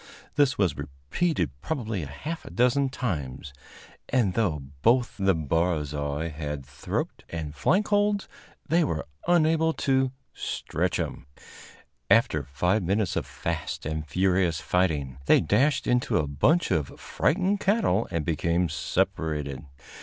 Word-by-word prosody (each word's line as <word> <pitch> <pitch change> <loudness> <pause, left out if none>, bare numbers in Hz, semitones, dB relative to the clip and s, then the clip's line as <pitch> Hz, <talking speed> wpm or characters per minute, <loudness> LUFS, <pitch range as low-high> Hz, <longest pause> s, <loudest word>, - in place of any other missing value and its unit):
This 140 -3 +3
was 90 -8 +2
repeated 70 - -1
probably 110 - -2
a 75 - -5
half 150 - -6
dozen 130 +3 +3
times, 75 - -4 0.6
and, 115 -8 +2
though 90 -11 0 0.2
both 120 - +3
the 95 -1 +3
barzois 75 -2 -1
had 75 -2 -5
throat 70 +1 -4
and 80 -3 -5
flank 190 - +1
holds, 205 -1 +2 0.4
they 170 +1 +3
were 80 - -2 0.2
unable 160 -1 +3
to 130 -3 +1 0.2
"stretch - - -2
him." - - -4 0.8
After 115 -9 +4
five 90 - +1
minutes 95 +2 0
of - - -2
fast 80 -2 -4
and 80 0 -3
furious 90 0 +2
fighting, 75 -8 0
they - - +7
dashed 130 - +2
into 125 0 +2
a 75 - +1
bunch 130 - +2
of 80 -6 -1
frightened 190 +5 +1
cattle 195 - +2
and 80 -3 -2
became 85 +2 +1
separated. 75 -1 -2
90 Hz, 130 wpm, -27 LUFS, -, 0.8 s, they